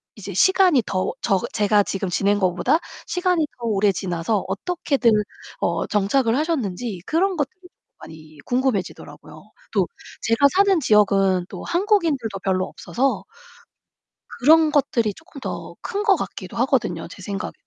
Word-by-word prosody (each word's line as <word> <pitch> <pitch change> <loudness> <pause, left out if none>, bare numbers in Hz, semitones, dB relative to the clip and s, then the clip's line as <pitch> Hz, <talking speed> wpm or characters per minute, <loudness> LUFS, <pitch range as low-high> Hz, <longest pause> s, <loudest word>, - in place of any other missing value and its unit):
이제 200 -2 -8
시간이 370 - +4
더 185 -1 -1
저 195 -4 +2
제가 210 -1 +3
지금 195 -1 -3
지낸 200 +3 +1
것보다 185 - +2 0.3
시간이 360 -3 +1
더 235 - -5
오래 205 -1 +2
지나서 180 +3 -2
어떻게들 265 - 0 0.5
어 - - 0
정착을 225 +4 +1
하셨는지 245 - -2
그런 365 +3 +1
것들이 310 +6 -3 0.4
많이 155 -1 -13
궁금해지더라고요. 245 -6 -3 0.3
또 - - +2 0.3
제가 230 +5 +4
사는 395 -2 +4
지역은 195 -5 +3
또 - - -8
한국인들도 335 - 0
별로 185 -1 +1
없어서 265 +2 -2 1.2
그런 315 +3 +5
것들이 235 -7 +1
쪼끔 300 +3 -14
더 - - -6
큰 405 +1 -3
것 405 -3 +5
같기도 - - -6
하거든요, - - 0
제 - - -12
생각에. 200 -2 -5
230 Hz, 310 characters per minute, -22 LUFS, 195-320 Hz, 1.2 s, 그런